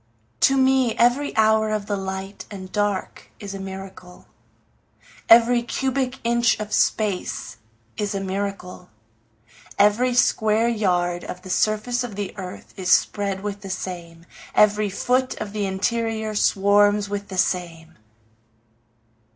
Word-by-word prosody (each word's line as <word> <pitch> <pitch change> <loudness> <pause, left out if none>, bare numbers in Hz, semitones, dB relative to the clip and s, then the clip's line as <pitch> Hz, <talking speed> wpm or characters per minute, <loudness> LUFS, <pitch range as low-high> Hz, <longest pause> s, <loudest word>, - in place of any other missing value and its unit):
To 270 - +4
me 260 -3 +3
every 245 +4 +2
hour 220 0 +3
of 215 -1 -2
the 205 - -2
light 190 0 -6
and 185 -2 -9
dark 205 -2 -2
is 200 -1 -7
a 195 - -6
miracle, 190 -2 -9 1.0
Every 235 +1 +6
cubic 265 +1 -2
inch 235 0 +2
of 210 0 -5
space 205 -4 -1 0.4
is 205 -1 -2
a - - -1
miracle, 195 -2 -5 0.9
Every 235 +5 +3
square 220 -1 +3
yard 180 -6 0
of 180 0 -8
the 185 - -7
surface 215 +6 0
of 230 -5 -6
the 205 -1 -5
earth 185 -2 -9
is 185 -2 -2
spread 200 -2 +1
with 205 -1 -5
the 195 - -8
same, 170 -3 -6 0.3
Every 210 0 +4
foot 255 +6 0
of 210 -1 -6
the 205 -2 -1
interior 220 +2 -1
swarms 205 0 +3
with 200 0 -4
the 190 - -7
same. 170 -3 -2
205 Hz, 135 wpm, -23 LUFS, 190-225 Hz, 1.0 s, Every